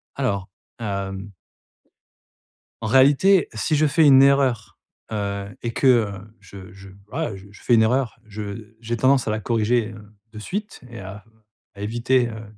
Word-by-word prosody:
Alors, 100 -8 -2 0.3
hem 100 -2 -5 1.5
en 110 - -3
réalité, 145 - +4
si 110 +8 -1
je 155 +1 +3
fais 155 +2 +3
une 135 -1 +8
erreur, 135 -5 +2 0.3
heu 100 -2 -3 0.2
et 120 - -3
que, 135 - -1
heu, 115 -5 +4 0.3
je 95 -2 -12
je, 95 0 -13 0.2
voilà, 130 -2 -3
je 95 0 -12
je 105 - -17
fais 120 - +3
une 110 - +5
erreur, 120 0 0
je 105 +1 -8
j'ai 115 +1 -3
tendance 130 +2 +3
à - - 0
la 110 0 -2
corriger, 115 0 0
heu, 105 -1 -12 0.3
de 110 - -10
suite 205 - -5
et 115 - -9
à 95 +2 -9 0.5
éviter, 120 +4 0
heu, 110 -1 -8
115 Hz, 160 wpm, -22 LUFS, 100-130 Hz, 1.5 s, une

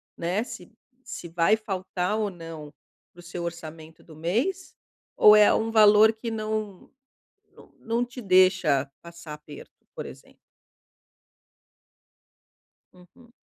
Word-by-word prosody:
né, 180 +6 -2
se - - -11 0.3
se - - -8
vai 170 +6 +2
faltar 190 -2 -3
ou 210 -2 -1
não 165 -4 -10 0.4
para 175 - -20
o 175 - -12
seu 175 0 -7
orçamento 160 -1 -9
do 160 - -15
mês? 235 - -2 0.4
Ou 210 0 +7
é 210 0 +6
um 225 0 -1
valor 215 0 +6
que 225 +1 -6
não 215 -3 -5 0.6
não - - -19
não 230 +2 -1
te 245 +1 -10
deixa 185 -8 +3
passar 170 -2 -11
aperto, 150 -1 -14
por - - -6
exemplo? - - -14 2.6
Uhum. 180 +7 -20
185 Hz, 125 wpm, -25 LUFS, 170-220 Hz, 2.6 s, Ou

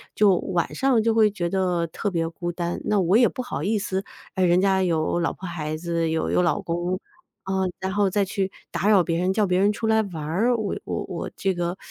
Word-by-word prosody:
就 205 -3 +5
晚 175 -1 -2
上 265 -4 +3
就 225 +1 +2
会 220 -2 +4
觉 175 -4 -2
得 180 -2 0
特 200 +5 -3
别 165 -2 0
孤 175 +1 -4
单。 175 0 -3
那 210 - +1
我 185 +1 +3
也 240 -1 +6
不 255 - -5
好 245 - -4
意 210 +3 +1
思， 190 -1 -2 0.3
哎， 190 - 0
人 175 0 +4
家 190 -1 +3
有 165 -2 +1
老 165 - +1
婆 190 - -8
孩 155 -3 -4
子 165 0 -1
有 160 0 -1
有 - - +2
老 175 +3 +1
公。 175 0 -2 0.4
啊， 190 0 -2 0.2
然 190 0 -3
后 205 -1 +2
再 200 +1 +1
去 190 0 -2 0.2
打 175 +4 0
扰 200 -4 +6
别 165 0 -1
人， 185 +1 +1
叫 210 +1 +2
别 180 -1 +1
人 200 +2 +4
出 215 +2 -4
来 220 0 +4
玩 175 -7 -6
儿， 200 +11 +1
我 215 -3 -2
我 - - -3
我 - - -5
这 195 -2 0
个 175 +1 -2
185 Hz, 255 characters per minute, -24 LUFS, 170-205 Hz, 0.4 s, 也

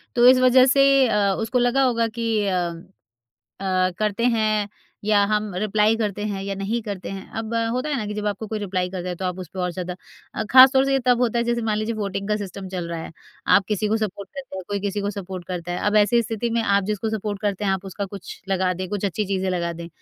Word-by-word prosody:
तो 240 0 +6
इस 255 0 +8
वजह 255 0 +6
से 275 0 +5
अ, 200 -3 +2
उसको 225 +3 0
लगा 245 +3 +3
होगा 230 -3 +2
कि 225 -2 -1
अ, - - +1
अ, 175 +1 -5 0.9
करते 215 +2 0
हैं 215 -3 +1 0.4
या 210 -1 +4
हम 210 -2 -1
रिप्लाई 215 +2 +2
करते 210 -2 -2
हैं 195 -1 -4
या 200 0 -3
नहीं 205 +5 -2
करते 200 -3 -6
हैं। 195 0 -8
अब 225 +1 -4 0.2
होता 255 +4 -2
है 295 - 0
ना 220 - -2
कि 210 - -4
जब 210 0 -3
आपको 205 +1 -2
कोई 215 +1 -3
रिप्लाई 185 -3 -2
करता 180 -1 -5
है 180 - -2
तो 190 - -6
आप 180 0 -2
उस 180 -3 -7
पर 185 - -4
और 180 - 0
ज़्यादा। 180 0 -5 0.6
खासतौर 265 +1 +8
से 275 - 0
ये 270 - +3
तब 245 -1 +4
होता 240 -1 +1
है 235 - +1
जैसे 235 0 0
मान 215 -1 0
लीजिए 215 +2 -2
वोटिंग 200 -2 -3
का 210 - +2
सिस्टम 195 -1 -7
चल 180 -2 -4
रहा 170 -1 -4
है। - - -9 0.3
आप 200 - +5
किसी 210 0 0
को 220 - +2
सपोर्ट 200 -3 -4
करते 270 -8 -8
हैं 190 - -5
कोई 200 -1 -2
किसी 205 0 -2
को 205 0 -1
सपोर्ट 190 -2 -7
करता 175 -1 -4
है। 180 - -2
अब 205 - +2
ऐसी 210 +3 +4
स्थिति 225 +1 -3
में 230 0 +1
आप 200 -2 +2
जिसको 215 +2 -2
सपोर्ट 210 -2 -3
करते 205 0 -1
हैं 195 - +2
आप 190 0 -3
उसका 195 +1 -4
कुछ 195 -1 -9
लगा 185 -1 +1
दें 185 +1 -5
कुछ 205 +1 -3
अच्छी 200 +2 -1
चीज़ें 190 -1 -1
लगा 170 -2 -1
दें, 170 0 -8
205 Hz, 255 wpm, -23 LUFS, 190-225 Hz, 0.9 s, इस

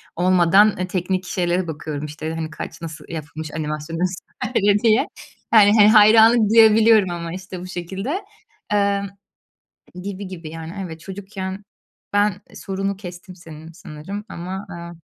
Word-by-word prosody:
olmadan, 185 +3 +4
eee, 185 0 -2
teknik 185 0 -2
şeylere 180 -1 -1
bakıyorum, 150 -1 -5
işte, 155 +2 -6
hani, 160 -1 -4
kaç, - - -8
nasıl 160 -2 -8
yapılmış 155 -1 -7
animasyon, 150 +1 -4
vs. 180 +1 -1 0.6
diye. 230 +5 +4 0.5
Yani, 205 -2 +7
hani, 205 - +8
hayranlık 220 +1 +6
duyabiliyorum 220 -2 +6
ama, 170 -1 -5
işte, 185 -1 -8
bu 185 - -8
şekilde, 195 - -4 0.5
eee, 200 -1 +2 1.0
gibi 200 0 -6
gibi, 170 -4 -8
yani. 165 +1 -8
Evet, 160 -2 -9
çocukken, 190 +1 -7 0.5
ben 205 -1 +1
sorunu 195 0 -3
kestim 180 -1 -10
senin 160 -2 -12
sanırım 175 +5 -8
ama, 185 +3 -6
aaa. 170 -2 -8
185 Hz, 135 wpm, -21 LUFS, 165-200 Hz, 1.0 s, hani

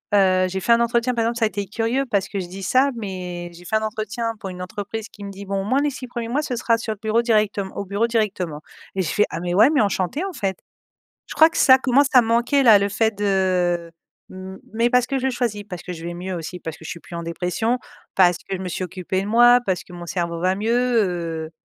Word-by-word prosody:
heu, 185 -2 +4
j'ai 190 +1 -3
fait 235 - +1
un 235 - +3
entretien, 235 +1 +1
par 230 - +1
exemple, 235 +1 -1
ça 225 - +3
a - - +1
été 200 0 -4
curieux 230 +6 -1
parce 200 -4 +1
que 200 - -4
je 180 - -4
dis 190 +2 -8
ça 260 +8 +3
mais 180 -5 -6
j'ai 175 +1 -14
fait 220 - -2
un 220 - -3
entretien 220 +2 -3
pour 195 - -6
une 180 0 -8
entreprise 205 +4 -6
qui 205 - -12
me 200 - -6
dit 200 +1 -9
bon: 195 0 -2
«moi 255 +6 +2
les 295 - +1
6 255 -1 -8
1er 235 -1 -5
mois 275 +5 0
ce 265 -5 -3
sera 230 -1 +1
sur 220 -1 -3
le 210 - -16
bureau 220 +1 +2
directeme 210 -4 +1
au 200 - -4
bureau 200 +4 0
directement» 195 -9 -1 0.3
et 190 - 0
je 160 - -2
fais: 210 - +3
«Ah 165 - -4
mais 175 0 -2
ouais 215 +8 +6
mais 295 -3 +3
enchanté, 200 - 0
en 390 - -5
fait». 195 - -2 0.7
Je - - -7
crois 320 +1 +7
que - - -6
ça 260 -1 +7
commence 270 +2 +3
à 250 - +8
manquer 235 +5 +2
là, 225 -5 +8
le 200 0 0
fait 220 +2 +1
de, 185 -4 +1 0.4
mmh 185 0 -9 0.2
mais 230 +2 +2
parce 250 -1 +4
que 270 0 -1
je 260 - -3
le - - +2
choisis, 235 -4 -2
parce 180 -4 -7
que 180 - -6
je 165 -1 -9
vais 175 - -4
mieux 185 +2 -5
aussi 175 +2 -6
parce 160 -1 -7
que - - -15
je - - -6
suis 170 - -6
plus 170 - -11
en 170 - -4
dépression 180 +8 -1 0.4
parce 180 -2 +5
que 195 - -5
je - - -8
me 185 - -4
suis 185 - -3
occupé 185 +1 -3
de 195 - -5
moi 240 +3 +6
parce 185 -3 0
que - - -15
mon 175 0 -8
cerveau 170 -1 -2
va 185 +1 +2
mieux, 215 +4 -1 0.8
heu, - - -30
205 Hz, 270 wpm, -22 LUFS, 185-235 Hz, 0.8 s, à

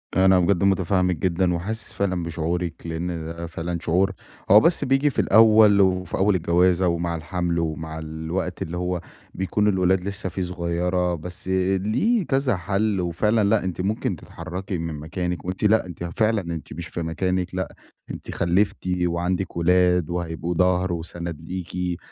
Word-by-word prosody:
أنا 95 -1 +5
بجد 90 +1 +2
متفهّمِك 95 -1 +2
جدًا 90 +2 +1
وحاسس 110 +6 -4
فعلًا 95 -3 -1
بشعورِك، 85 +1 -2
لإن 80 +2 -3 0.2
ده 85 +1 -6
فعلًا 85 +1 -4
شعور 95 +4 +2 0.4
هو 105 - +10
بس 170 +8 +3
بييجي 135 +3 +3
في - - -4
الأول 110 -1 +6
وفي 90 -2 +1
أول 100 0 +3
الجوازة 90 +2 +3
ومع 85 0 -1
الحمل 85 +1 -2
ومع 80 0 -3
الوقت 80 +3 -4
اللي 85 +2 -3
هو 90 -1 -2 0.3
بيكون 100 +3 0
الولاد 95 -2 +2
لسّه 100 -1 -3
فيه 95 - -4
صغيّرة، 90 0 -1
بس 90 +3 -8
ليه 95 - +1
كذا 135 -4 +1
حل 100 +2 0
وفعلًا 105 +6 +1
لأ 100 0 +2
أنتِ 90 -1 -3
ممكن 105 +4 -1
تتحركي 90 +2 -6
من 80 -1 -4
مكانِك 90 +1 -4
وأنتِ 95 +3 -4
لأ 110 -1 +4
أنتِ 85 -1 -8
فعلًا 110 +5 +1
أنتِ 85 -4 -6
مش 85 +2 -6
في 85 - -5
مكانِك، 90 +2 -2
لأ 95 - -3 0.4
أنتِ - - -7
خلّفتِ 95 +2 0 0.2
وعندِك 90 +1 -1
ولاد 90 -1 +3
وهيبقوا 85 -1 -3
ضهر 90 0 +2
وسند 85 -1 -5
ليكِ، 90 -1 -3
90 Hz, 155 wpm, -23 LUFS, 85-95 Hz, 0.4 s, هو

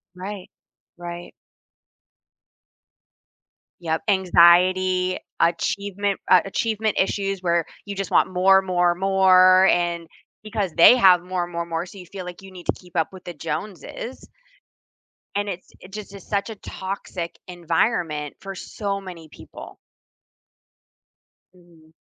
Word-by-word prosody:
Right. 190 +1 -7 0.5
Right. 175 0 -8 2.5
Yep. 160 -2 -2
Anxiety, 185 0 +4 0.2
achievement 200 +4 0
a 185 - +7
achievement 220 +1 -1
issues 195 0 -1
where 170 -2 +1 0.2
you 200 0 -6
just 195 -1 -4
want - - +3
more, 190 +1 +5
more, 180 -2 +1
more, 185 0 +5
and 170 -2 0 0.4
because 210 -3 -3
they 170 +10 +8
have 185 -7 +6
more, 180 -1 -3
more, 170 -1 -4
more, 165 0 -3
so 185 - -13
you 180 - -10
feel 190 +2 -8
like 180 +1 -9
you 195 0 -13
need 180 -2 -12
to - - +2
keep 180 -2 -19
up 160 -2 0
with 185 -1 -12
the 175 - -6
Joneses. 205 - -6 1.1
And 205 0 -1
it's 180 -2 -7
it 185 - -14
just 205 -1 -8
is 195 - -11
such 200 +1 -2
a 225 - -6
toxic 190 -3 -6
environment 170 -3 -1
for 195 0 -8
so 200 +2 -4
many 175 -4 -10
people. - - -12 1.8
Mhm. 170 -3 -22
185 Hz, 130 wpm, -23 LUFS, 175-195 Hz, 2.5 s, they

